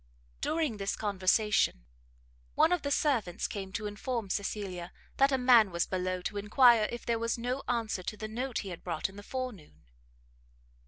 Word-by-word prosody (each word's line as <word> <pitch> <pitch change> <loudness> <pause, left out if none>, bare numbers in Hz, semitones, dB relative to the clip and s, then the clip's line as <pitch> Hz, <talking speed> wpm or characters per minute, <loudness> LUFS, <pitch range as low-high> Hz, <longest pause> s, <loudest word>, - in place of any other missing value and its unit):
During 310 -9 -1
this 195 -1 -2
conversation, 200 - +1 0.7
one 325 - +4
of 360 - +2
the 285 - -2
servants 230 - 0
came 195 -2 -6
to 215 - -3
inform 210 0 -3
Cecilia, 190 -3 -3 0.3
that 275 +1 +4
a 265 - +3
man 245 -5 +6
was 170 -1 0
below 185 -1 -2
to 205 - -3
enquire 225 +1 +5
if 240 - -6
there 230 -1 0
was 230 +1 -1
no 250 +3 -2
answer 230 -5 -1
to 210 +4 -5
the 215 - -5
note 245 +3 -3
he - - -5
had 175 - -8
brought 170 +2 -2
in 190 - -14
the 205 - -9
forenoon. 245 - -6
215 Hz, 175 wpm, -30 LUFS, 190-245 Hz, 0.7 s, man